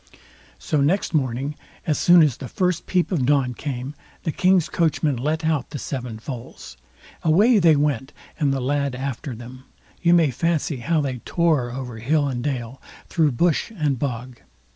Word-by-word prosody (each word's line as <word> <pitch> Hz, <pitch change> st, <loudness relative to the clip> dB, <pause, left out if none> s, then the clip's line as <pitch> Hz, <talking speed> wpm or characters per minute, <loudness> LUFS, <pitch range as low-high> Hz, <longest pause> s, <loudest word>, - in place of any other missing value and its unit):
So 150 Hz, -, 0 dB
next 175 Hz, +9 st, +1 dB
morning, 135 Hz, -1 st, 0 dB, 0.3 s
as 155 Hz, -, +1 dB
soon 175 Hz, -1 st, +7 dB
as 145 Hz, -6 st, +1 dB
the 130 Hz, -, -7 dB
first 180 Hz, +4 st, -1 dB
peep 180 Hz, 0 st, +1 dB
of 160 Hz, -8 st, +1 dB
dawn 135 Hz, -2 st, +2 dB
came, 130 Hz, +1 st, -5 dB, 0.3 s
the 160 Hz, -, -1 dB
king's 185 Hz, -1 st, +3 dB
coachman 155 Hz, -3 st, +1 dB
let 155 Hz, +6 st, -1 dB
out 155 Hz, -6 st, 0 dB
the -, -, -5 dB
seven 125 Hz, -5 st, -5 dB
foals. 115 Hz, -, -8 dB, 0.5 s
Away 205 Hz, +9 st, +4 dB
they 165 Hz, -4 st, +5 dB
went, 140 Hz, -2 st, 0 dB, 0.3 s
and 145 Hz, -3 st, +2 dB
the 135 Hz, -1 st, -1 dB
lad 140 Hz, 0 st, 0 dB
after 130 Hz, 0 st, -4 dB
them. 125 Hz, +3 st, -11 dB, 0.4 s
You 175 Hz, 0 st, +5 dB
may 160 Hz, -5 st, +4 dB
fancy 160 Hz, -1 st, -1 dB
how 155 Hz, +6 st, 0 dB
they 130 Hz, -3 st, -3 dB
tore 155 Hz, -4 st, +1 dB
over 125 Hz, -2 st, -6 dB
hill 145 Hz, +5 st, +1 dB
and 125 Hz, -3 st, -3 dB
dale, 130 Hz, -2 st, -4 dB, 0.3 s
through 155 Hz, -5 st, +2 dB
bush 170 Hz, -, +1 dB
and 145 Hz, -6 st, 0 dB
bog. 125 Hz, -2 st, -4 dB
145 Hz, 170 wpm, -23 LUFS, 125-160 Hz, 0.5 s, soon